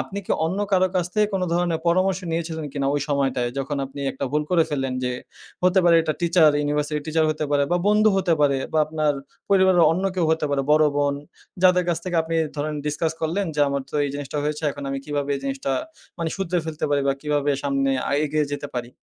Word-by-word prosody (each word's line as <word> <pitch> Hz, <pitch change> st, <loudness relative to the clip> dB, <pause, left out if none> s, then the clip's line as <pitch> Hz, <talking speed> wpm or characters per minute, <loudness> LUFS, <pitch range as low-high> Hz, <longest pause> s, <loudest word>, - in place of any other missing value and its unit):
আপনি 200 Hz, -, -5 dB
কি -, -, 0 dB
অন্য 185 Hz, +4 st, -2 dB
কারো 185 Hz, -1 st, +4 dB
কাছ 175 Hz, -1 st, +1 dB
থেকে 210 Hz, 0 st, +3 dB
কোনো 185 Hz, -1 st, 0 dB
ধরনের 170 Hz, -2 st, 0 dB
পরামর্শ 185 Hz, +2 st, +2 dB
নিয়েছিলেন 160 Hz, -1 st, -3 dB
কিনা? 140 Hz, -1 st, -1 dB
ওই 145 Hz, -, 0 dB
সময়টায় 135 Hz, -4 st, 0 dB
যখন 140 Hz, +2 st, -2 dB
আপনি 135 Hz, +1 st, -9 dB
একটা 135 Hz, -, -4 dB
ভুল 150 Hz, 0 st, +2 dB
করে 175 Hz, -2 st, +4 dB
ফেললেন 135 Hz, -3 st, -1 dB
যে 125 Hz, -, -1 dB, 0.5 s
হতে 185 Hz, +1 st, +4 dB
পারে 170 Hz, -1 st, +6 dB
এটা 155 Hz, -, -1 dB
টিচার, 170 Hz, -2 st, +5 dB
ইউনিভার্সিটি 150 Hz, +1 st, -1 dB
টিচার 160 Hz, 0 st, +1 dB
হইতে 155 Hz, 0 st, -1 dB
পারে 145 Hz, -1 st, +3 dB
বা -, -, +4 dB
বন্ধু 210 Hz, +1 st, +5 dB
হতে 185 Hz, -3 st, +2 dB
পারে 140 Hz, -2 st, +3 dB
বা 160 Hz, -, +2 dB
আপনার 155 Hz, -1 st, 0 dB, 0.4 s
পরিবারের 190 Hz, -3 st, +5 dB
অন্য 185 Hz, +3 st, -2 dB
কেউ 180 Hz, -2 st, +1 dB
হতে 160 Hz, -1 st, +1 dB
পারে, 140 Hz, -1 st, +1 dB
বড় 155 Hz, 0 st, +5 dB
বোন 145 Hz, -1 st, +1 dB, 0.5 s
যাদের 180 Hz, -1 st, +5 dB
কাছ 170 Hz, -2 st, +1 dB
থেকে 180 Hz, -2 st, -2 dB
আপনি 165 Hz, +1 st, -4 dB, 0.2 s
ধরেন 150 Hz, +1 st, -2 dB
ডিসকাস 150 Hz, +2 st, -1 dB
করলেন 175 Hz, +5 st, -1 dB
যে 150 Hz, -, 0 dB
আমার 140 Hz, -1 st, -2 dB
তো -, -, -13 dB
এই -, -, -1 dB
জিনিসটা 145 Hz, +1 st, -4 dB
হয়েছে। 150 Hz, +1 st, -2 dB
এখন 145 Hz, 0 st, -8 dB
আমি 135 Hz, -, -2 dB
কিভাবে 145 Hz, -1 st, -2 dB
এই -, -, -7 dB
জিনিসটা 135 Hz, 0 st, -2 dB, 0.5 s
মানে 165 Hz, -1 st, -2 dB
শুধরে 185 Hz, -2 st, -1 dB
ফেলতে 155 Hz, -1 st, -3 dB
পারি 140 Hz, -1 st, +2 dB
বা 135 Hz, -, +2 dB
কিভাবে 145 Hz, -1 st, 0 dB, 0.2 s
সামনে 135 Hz, -1 st, +1 dB, 0.2 s
আ -, -, -2 dB
এগিয়ে 150 Hz, 0 st, 0 dB
যেতে 145 Hz, 0 st, -3 dB
পারি। 120 Hz, 0 st, -8 dB
155 Hz, 220 wpm, -23 LUFS, 145-175 Hz, 0.5 s, পারে